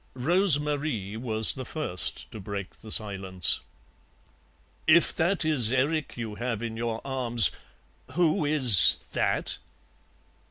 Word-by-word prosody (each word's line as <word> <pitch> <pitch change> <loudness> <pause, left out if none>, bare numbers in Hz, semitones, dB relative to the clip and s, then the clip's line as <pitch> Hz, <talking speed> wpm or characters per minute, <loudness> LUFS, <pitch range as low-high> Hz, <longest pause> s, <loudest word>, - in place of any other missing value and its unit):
Rose 170 +4 +1
Marie 145 -9 -5
was 110 -2 +1
the 130 - -8
first 130 - -4
to 110 - -10
break 100 -1 -8
the 110 - -15
silence. 95 -5 0 1.3
"If 165 +2 +3
that 175 +1 -2
is 130 -8 0
Erik 145 +3 -2
you 115 -3 -7
have 115 0 -6
in 115 -1 -6
your 115 0 -6
arms, 120 - +1 0.6
who 170 +2 0
is 130 - +8 0.2
that?" - - -3
120 Hz, 120 wpm, -25 LUFS, 110-150 Hz, 1.3 s, is